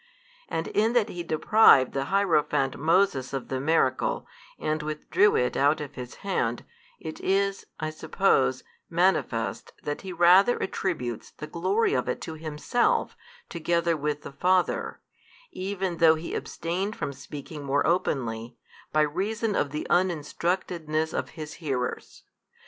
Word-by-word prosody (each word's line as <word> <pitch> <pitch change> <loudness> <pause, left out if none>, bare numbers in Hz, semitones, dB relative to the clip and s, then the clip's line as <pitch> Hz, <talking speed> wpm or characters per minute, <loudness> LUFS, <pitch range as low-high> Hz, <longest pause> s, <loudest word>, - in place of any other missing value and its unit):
and 160 - -2
in 220 +3 +2
that 235 -3 +2
He 175 - -5
deprived 160 - +5
the 135 0 -1
hierophant 150 -7 +1
Moses 155 -4 +2
of 135 -2 -4
the 130 - -2
miracle, 140 -2 +1 0.3
and 155 0 -1
withdrew 155 +7 +2
it 125 - +1
out 145 +2 +3
of 150 -2 -6
his 125 0 -8
hand, 120 -12 -1 0.3
it 160 -1 -7
is 195 +1 0
(I 155 0 -2
suppose) 145 -5 +1 0.3
manifest 165 - 0
that 145 0 -3
He 190 - -7
rather 180 +6 +5
attributes 125 - -3
the - - -9
glory 185 +8 0
of 125 -1 0
it - - -2
to 160 - -5
Himself 160 +10 0 0.3
together 170 0 0
with 150 -1 -2
the - - -8
Father, 180 +4 +1 0.5
even 190 -2 -3
though 160 -1 +6
He 160 +2 -6
abstained 185 +5 -3
from 140 - -4
speaking 145 +2 -9
more 140 +1 +1
openly, 120 -9 -1 0.3
by 155 - +3
reason 200 +8 -1
of 145 - +1
the 150 +2 -4
uninstructedness 170 -2 0
of - - -2
His 155 -1 -6
hearers. 130 -5 -3
160 Hz, 140 wpm, -27 LUFS, 140-185 Hz, 0.5 s, though